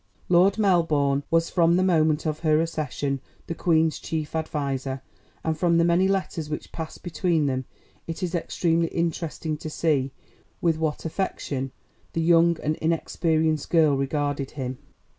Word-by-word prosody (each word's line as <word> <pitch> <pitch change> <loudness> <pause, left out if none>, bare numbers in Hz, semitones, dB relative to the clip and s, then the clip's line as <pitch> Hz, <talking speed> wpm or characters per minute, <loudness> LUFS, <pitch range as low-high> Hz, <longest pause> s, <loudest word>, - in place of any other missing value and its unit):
Lord 180 +4 +5
Melbourne 160 -9 +2
was 165 0 +2
from 170 -1 +4
the 185 - +3
moment 160 -4 +2
of 155 -1 -1
her 155 -2 +3
accession 145 -4 -2 0.2
the - - -3
Queen's 160 -2 +2
chief 155 -1 -4
adviser, 140 -4 -2 0.4
and 160 0 0
from 170 +1 +2
the 170 - +4
many 175 +2 +3
letters 185 -5 -1
which 150 - -5
passed 160 -1 -7
between 170 -2 +1
them 130 -1 -1 0.4
it 165 +3 -5
is 175 -1 -2
extremely 170 -1 +1
interesting 165 -2 -2
to 155 0 -6
see 150 -4 +1 0.5
with 165 -2 +2
what 160 -1 -2
affection 145 -6 -3 0.4
the 165 - 0
young 170 0 +4
and 155 +1 0
inexperienced 160 -1 0
girl 160 -4 +4
regarded 140 0 -1
him. 130 -1 -4
160 Hz, 150 wpm, -25 LUFS, 150-170 Hz, 0.5 s, Lord